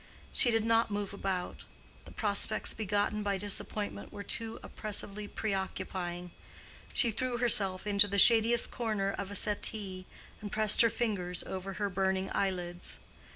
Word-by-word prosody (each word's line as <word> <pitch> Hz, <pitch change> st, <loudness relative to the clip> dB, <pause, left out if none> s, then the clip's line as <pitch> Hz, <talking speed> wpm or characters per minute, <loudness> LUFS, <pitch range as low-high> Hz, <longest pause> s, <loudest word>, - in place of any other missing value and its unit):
She 245 Hz, -, +5 dB
did 225 Hz, -1 st, +1 dB
not 230 Hz, 0 st, +3 dB
move 205 Hz, -1 st, -4 dB
about; 190 Hz, -2 st, -4 dB, 0.4 s
the -, -, -12 dB
prospects 210 Hz, 0 st, 0 dB
begotten 210 Hz, 0 st, -1 dB
by 200 Hz, -1 st, -1 dB
disappointment 205 Hz, +1 st, -1 dB
were 200 Hz, -, -8 dB
too 225 Hz, +2 st, -2 dB
oppressively 210 Hz, -1 st, -2 dB
preoccupying; 190 Hz, -4 st, -4 dB, 0.6 s
she 235 Hz, -, +3 dB
threw 250 Hz, +2 st, -2 dB
herself 200 Hz, -6 st, +3 dB
into 205 Hz, 0 st, +4 dB
the 200 Hz, 0 st, -2 dB
shadiest 230 Hz, +2 st, +5 dB
corner 215 Hz, -4 st, -1 dB
of 200 Hz, -1 st, -5 dB
a 200 Hz, -, -7 dB
settee, 200 Hz, -3 st, 0 dB, 0.3 s
and 205 Hz, -1 st, -7 dB
pressed 215 Hz, -1 st, +4 dB
her 230 Hz, -, +5 dB
fingers 195 Hz, -7 st, -2 dB
over 190 Hz, +1 st, -6 dB
her 205 Hz, +1 st, -2 dB
burning 190 Hz, 0 st, -1 dB
eyelids. 180 Hz, -2 st, -3 dB
205 Hz, 145 wpm, -31 LUFS, 190-220 Hz, 0.6 s, She